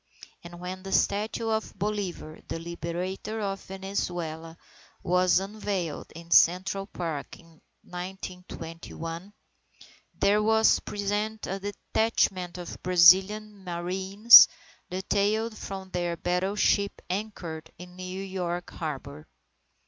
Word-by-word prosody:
And 175 0 -10
when 185 +1 -6
the 195 0 -8
statue 215 +4 +1
of 220 0 -2
Bolivar, 195 -6 -3
the - - -4
Liberator 170 +5 -4
of 195 -2 -3
Venezuela, 175 -4 -4 0.5
was 180 0 +3
unveiled 195 -5 -4
in 170 0 -11
Central 190 +4 +4
Park 160 -8 -5
in 165 -2 -20 0.2
1921, 180 -1 -7 0.8
there 205 +1 +3
was 220 +1 +4
present 210 +2 -3
a 195 +1 -3
detachment 195 -3 -1
of 175 -1 -8
Brazilian 190 +4 +5
Marines 190 +5 +7 0.4
detailed 205 +4 0
from 190 -2 -7
their 175 -1 -2
battleship 195 +3 +1
anchored 180 -5 -5
in 180 +1 -12
New 185 +1 -6
York 180 -2 -4
Harbour. 150 -1 -6
185 Hz, 105 wpm, -27 LUFS, 175-200 Hz, 0.8 s, Marines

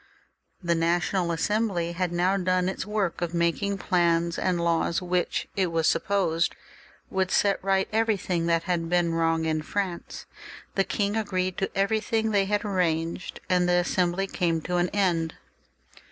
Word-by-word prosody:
The 170 0 +2
National 170 +2 +1
Assembly 185 -1 0
had 180 0 -2
now 180 +3 +2
done 185 -1 +1
its 190 +1 -3
work 205 -5 -1
of 175 0 -2
making 170 +4 0
plans 170 -2 +1
and 180 -2 0
laws, 170 0 +1
which 180 -1 -1
it 190 -2 +2
was 165 -1 +1
supposed 175 -4 +1 0.6
would 190 -1 0
set 200 0 +2
right 195 0 +2
everything 195 -6 +1
that 165 -1 +2
had 170 -2 -1
been 175 -1 +2
virrong 165 0 +1
in 155 -1 0
France. 185 +1 -4 0.5
The 195 - +2
king 205 0 -1
agreed 185 -4 -1
to 195 - 0
everything 220 +2 +1
they 200 -2 +3
had 205 +1 -1
arranged, 170 -3 -1
and 180 -1 +2
the - - +3
Assembly 180 +1 +1
came 170 -4 0
to 180 +2 -2
an 175 0 +1
end. 170 -5 0
180 Hz, 155 wpm, -26 LUFS, 170-195 Hz, 0.6 s, they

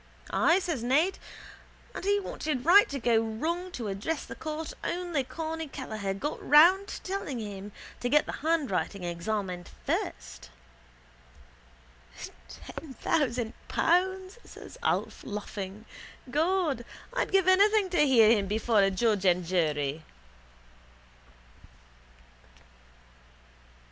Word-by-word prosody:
—Ay, 335 - +4
says 340 -9 -2
Ned. 300 +11 +2 0.7
And - - -6
he 405 0 +3
wanted 300 -8 -4
right 390 +5 +7
go 230 -2 +4
wrong 325 +12 -3
to 235 -4 -4
address 205 +11 -3
the - - -8
court 315 +6 -5
only 345 -5 -1
Corny 320 +3 -5
Kelleher 215 -8 -4
got 295 +10 -4
round 365 +7 +6
him - - -6
telling 375 -9 -4
him 205 -2 -7 0.3
to 245 - -2
get 295 +3 +4
the - - -5
handwriting 275 - -1
examined 180 +1 -3 0.2
first. - - -3 2.0
—Ten 265 - -10
thousand 245 -6 0
pounds, 375 +4 +1
says - - -12
Alf, - - -1
laughing. 205 0 -6 0.5
God, 320 -4 +1 0.3
I'd - - -1
give 385 -2 +3
anything 400 +1 +4
to 350 - +1
hear 225 -5 +6
him 205 -4 +2
before 215 +1 +2
a 195 - +4
judge 205 0 +1
and 180 -1 +3
jury. 155 -4 0
260 Hz, 115 wpm, -28 LUFS, -, 2.0 s, right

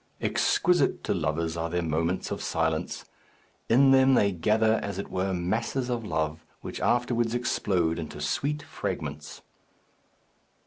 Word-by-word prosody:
Exquisite - - +2
to - - 0
lovers 80 +2 -1
are 85 0 -2
their 90 +1 -1
moments 85 +3 -1
of - - -3
silence! 80 -1 -1 0.6
In 135 +4 +6
them 135 0 +6
they 100 -3 +3
gather, 110 +5 +2
as 100 -2 -4
it 100 - -5
were, 95 +1 -1
masses 115 +8 -1
of 120 -2 -2
love, 80 -4 -2 0.2
which - - -6
afterwards 120 -1 +1
explode 90 -8 0
into 75 -2 -7
sweet 145 - -1
fragments. 75 0 -5
95 Hz, 135 wpm, -27 LUFS, 80-115 Hz, 0.6 s, In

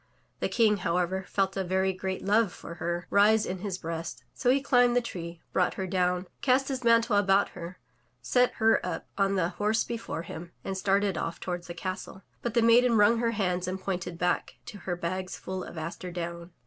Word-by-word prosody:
The - - -1
King, 215 -3 +3
however, 180 +1 -1
felt 195 -1 0
a 195 - 0
very 190 +1 +1
great 190 0 -4
love 210 0 +3
for 170 - -9
her 175 0 -2
rise 210 +2 +5
in 185 0 -4
his 190 -1 -3
breast, 165 -1 -5
so 245 - 0
he 265 +2 +5
cUmbed 245 -3 +4
the - - +6
tree, 170 -7 -7
brought 180 - +2
her 190 - -3
down, 180 -1 0 0.2
cast 265 +1 +3
his 260 -2 -3
mantle 230 -1 +4
about 195 0 +3
her, 175 +1 -8 0.4
set 245 - +2
her 225 0 +3
up - - -4
on 195 -1 +2
the 175 -3 +1
horse 215 +3 +1
before 230 -7 -5
him, 170 +1 -8
and 195 - -3
started 195 -1 +1
off 165 - -3
toward 175 -1 -4
the 175 - -7
castle. 185 0 -5 0.2
But 240 -1 -3
the 235 - +4
maiden 230 0 +5
wrung 210 +3 +5
her 235 0 +1
hands 180 -4 0
and 185 +1 -3
pointed 180 -2 -3
back 180 +1 0
to 215 -4 -9
her 175 - +1
bags 185 +2 -4
full 185 -1 -5
of - - -9
aster 165 +3 -5
down. 170 0 -5
190 Hz, 205 wpm, -28 LUFS, 180-220 Hz, 0.4 s, the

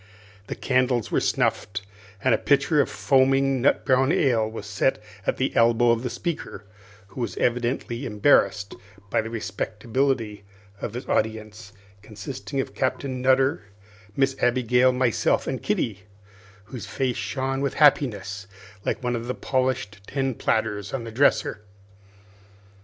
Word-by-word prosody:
The - - -4
candles 125 -3 +1
were - - +3
snuffed, 100 -1 0 0.4
and - - +4
a - - +4
pitcher 145 +2 +3
of - - -1
foaming 135 0 +2
nut 135 - +2
brown 130 +1 +3
ale 115 -9 +2
was 110 -2 -7
set 105 +5 0 0.3
at - - +1
the 130 - -1
elbow 115 +1 +4
of 115 -1 +1
the 125 - -3
speaker, 170 -6 -5 0.5
who 125 - -7
was 115 - -3
evidently 120 +1 -1
embarrassed 105 -3 +2 0.4
by - - +2
the 110 - -6
respectability 110 +1 -2 0.4
of 110 - -4
his 125 - -5
audience, 110 -1 -2 0.3
consisting 115 +6 -6
of 135 - -3
Captain 130 -1 -2
Nutter, 130 +3 +3 0.5
Miss 135 -1 +2
Abigail, 125 +1 +3
myself, 125 -2 +1
and - - -3
Kitty, - - -1 0.6
whose 120 +4 -8
face 130 -3 -1
shone 130 +5 -2
with 140 - -1
happiness 105 -9 +2 0.4
like - - -2
one 125 0 0
of 115 0 -5
the 125 - -2
polished 130 -6 -1
tin 135 -1 -1
platters 105 -1 -1
on 125 - -4
the 115 - -7
dresser. 120 -3 +2
125 Hz, 140 wpm, -24 LUFS, 110-135 Hz, 0.6 s, and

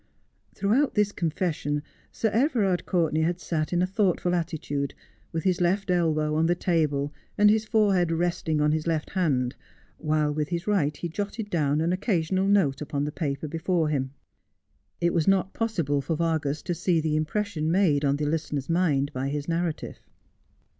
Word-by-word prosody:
Throughout 235 +9 +1
this 210 -1 +2
confession 155 -4 -2 0.3
Sir 220 - 0
Everard 215 - +1
Courtenay 165 -4 +1
had 175 +2 0
sat 155 -2 -2
in 175 0 +2
a - - +3
thoughtful 185 -2 +1
attitude, 155 -5 -2 0.4
with 160 - -3
his 185 -2 +1
left 190 +2 +1
elbow 155 -3 +1
on 160 +1 +2
the 175 - +2
table, 150 -5 0 0.2
and 210 0 +6
his 220 0 +1
forehead 200 -6 +2
resting 165 -2 0
on 150 0 +3
his 155 +1 -1
left 160 -2 -1
hand, 135 -9 0 0.4
while 155 -1 +1
with 150 0 -2
his 170 0 -3
right 150 -9 +1
he 175 - -3
jotted 205 +4 -4
down 150 -3 +1
an 170 +2 +1
occasional 190 -1 0
note 175 -10 +2
upon 145 -1 -2
the 150 - -2
paper 145 -2 -3
before 165 +1 0
him. 135 -3 -1 0.9
It 170 0 +1
was 165 -3 +1
not 195 -1 +2
possible 170 - 0
for 165 +4 -2
Vargas 155 -3 -1
to 175 - -2
see 175 0 +1
the 155 -1 0
impression 155 0 -1
made 170 -6 +3
on 140 -1 +2
the 150 +1 -2
listener's 150 -1 -2
mind 150 -5 +1
by 130 +1 -2
his 145 0 -3
narrative. 170 -1 -2
165 Hz, 175 wpm, -26 LUFS, 150-185 Hz, 0.9 s, and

